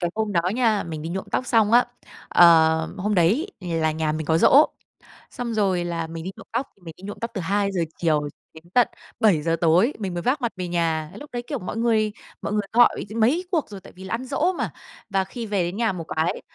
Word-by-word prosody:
cái 175 -1 -1
hôm 215 -1 -1
đó 170 - +3
nha, 225 -4 +2
mình 160 -2 -6
đi 165 - -4
nhuộm 190 +2 -4
tóc 255 - -1
xong 220 -2 +3
á, 245 +1 +6 0.4
ờ, 160 -2 +5
hôm 205 +2 -1
đấy 200 - +3
là 165 -3 0
nhà 155 -1 -1
mình 155 -1 -4
có 160 0 +3
giỗ, 290 - +7 0.7
xong 235 -2 -4
rồi 190 -5 +1
là 170 -1 -3
mình 165 0 -7
đi 190 - -5
nhuộm - - -13
tóc. 240 +4 -2
Thì 195 - -31
mình 165 -2 -9
đi 185 - -17
nhuộm 205 - -7
tóc 230 0 -4
từ 195 - -3
2:00 200 -1 0 0.2
chiều 150 -3 +1 0.3
đến 160 +1 -14
tận 245 -1 +5 0.3
7:00 165 -7 +3
tối, 175 - +4
mình 190 -4 -3
mới 175 - -3
vác 265 +2 +1
mặt 235 - -1
về 180 -1 -4
nhà. 165 -3 -1
Lúc 295 +1 -11
đấy, 240 0 -4
kiểu, 280 -5 -3
mọi 195 +4 -6
người 220 -2 +2 0.3
mọi - - -3
người 210 - +2
gọi 240 -2 +4
mấy 265 +12 +2
cuộc 315 -10 0
rồi, 200 -2 -9
tại - - -15
vì 185 - -12
là 190 - -5
ăn 245 +3 -3
giỗ 300 +7 0
mà. - - -2 0.4
Và 195 -1 +1
khi 235 +4 -7
về 200 -4 0
đến 175 +4 -4
nhà 230 -4 +1
một 170 -3 -6
cái, 160 +2 0
190 Hz, 245 wpm, -23 LUFS, 165-230 Hz, 0.7 s, giỗ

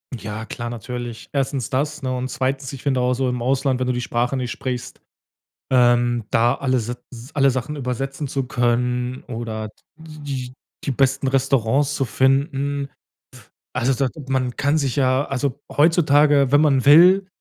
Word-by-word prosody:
Ja 110 0 -6
klar, 120 0 -6
natürlich. 120 -1 -6
1. 135 -4 -1
das, 150 +3 -2
ne, 130 -1 -2
und 125 +1 -3
2., 135 +1 -2
ich 135 - -8
finde 130 -3 0
auch 125 0 +2
so 130 +1 -1
im 125 -1 -2
Ausland, 130 +1 +1
wenn 130 - -1
du 125 - +1
die 125 - -2
Sprache 125 +2 -1
nicht 125 -1 -3
sprichst, 125 -2 -5 0.7
ähm, 120 -2 +3
da 120 +3 +3
alle 130 -2 0
s 115 -1 -3 0.2
s 120 +3 -11
alle 140 -2 +4
Sachen 130 +4 -4
übersetzen 135 +2 -3
zu 135 -1 -2
können 125 +1 -1
oder 115 -2 -5
d - - -20 0.3
die 145 -5 -7 0.3
die - - -1
besten 135 +1 +1
Restaurants 135 +1 +1
zu 135 - 0
finden, 140 +2 0 0.8
also 130 +3 +1
da 135 +1 0 0.2
man 130 -2 -1
kann 145 +2 +1
sich 135 -3 -1
ja 130 0 +2
also 135 -1 -2
heutzutage, 145 -3 +4
wenn 145 +1 +5
man 135 -4 +3
will, 180 +6 +7
130 Hz, 170 wpm, -21 LUFS, 125-140 Hz, 0.8 s, will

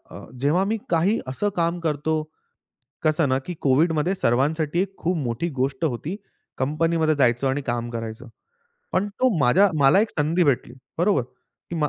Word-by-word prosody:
अ, - - -9
जेव्हा 150 +8 +2
मी 220 +3 0
काही 175 +6 +2
असं 135 +11 -1
काम 170 +1 0
करतो 155 -1 -1 0.9
कसं 155 -2 +2
ना, 130 - +2
की 180 - -4
कोव्हिडमध्ये 155 +6 +2
सर्वांसाठी 155 +5 +1
खूप 180 +3 -1
मोठी 130 +3 -2
गोष्ट 135 +3 -1
होती 150 +6 -3 0.4
कंपनीमध्ये 155 +3 +1
जायचं 125 -1 +2
आणि 135 +2 -1
काम 120 0 -2
करायचं. 115 +2 -6 0.7
पण 205 - +1
तो 255 +5 +1
माझ्या 165 +9 +5
मला 140 +8 +6
एक 220 - 0
संधी 160 +4 +1
भेटली 125 -4 0 0.2
बरोबर 185 -4 +3
की 130 +7 -12
मा 150 -2 +1
155 Hz, 155 wpm, -23 LUFS, 130-170 Hz, 0.9 s, मला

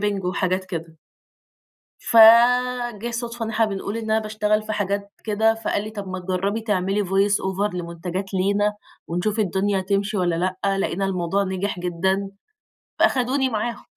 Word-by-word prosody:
،marketing 200 -2 -1
وحاجات 185 0 0
كده. 165 -3 -7 1.0
فجِه 240 0 +5
صدفة 235 0 -4
إن 225 - -4
إحنا 225 +1 +2
بنقول 200 +1 -4
إن 220 -1 -4
أنا 220 - +4
باشتغل 215 0 0
في 215 0 -5
حاجات 200 0 -2
كده، 220 +1 +2
فقال 225 -2 -2
لي: 215 - -6
"طب 205 -3 -7
ما 185 0 -4
تجربي 190 +4 -2
تعملي 200 -1 0
voice 195 +2 +2
over 190 +1 -1
لمنتجات 180 +3 -5
لينا، 205 +2 +1 0.3
ونشوف 190 +6 -1
الدنيا 195 0 +1
تمشي 200 +2 -1
والّا 175 -3 +1 0.3
لأ" 195 0 +2
لاقينا 195 0 -1
الموضوع 190 +1 0
نجح 190 0 -3
جدًا، 190 +3 -1 0.7
فاخدوني 260 +1 +2
معاهم، 230 +1 -3
200 Hz, 150 wpm, -23 LUFS, 190-220 Hz, 1.0 s, فجِه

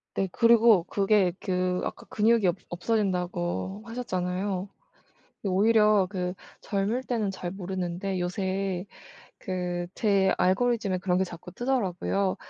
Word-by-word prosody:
네 195 - 0
그리고 230 -4 +5
그게 195 -2 +2
그 180 -1 -1
아까 - - -5
"근육이 220 -1 +3
없 175 - +2
없어진다."고 185 0 -1
하셨잖아요. 190 -4 -2 0.8
오히려 210 +1 +4
그 180 -2 -2 0.3
젊을 210 +6 -1
때는 225 -6 -1
잘 185 -2 -5
모르는데 185 0 -3
요새 190 0 -2 0.5
그 180 -1 -3
제 195 -3 +2
알고리즘에 200 0 +2
그런 180 0 +1
게 190 - +2
자꾸 175 0 -10
뜨더라고요. 200 -6 0
190 Hz, 265 characters per minute, -27 LUFS, 180-210 Hz, 0.8 s, 그리고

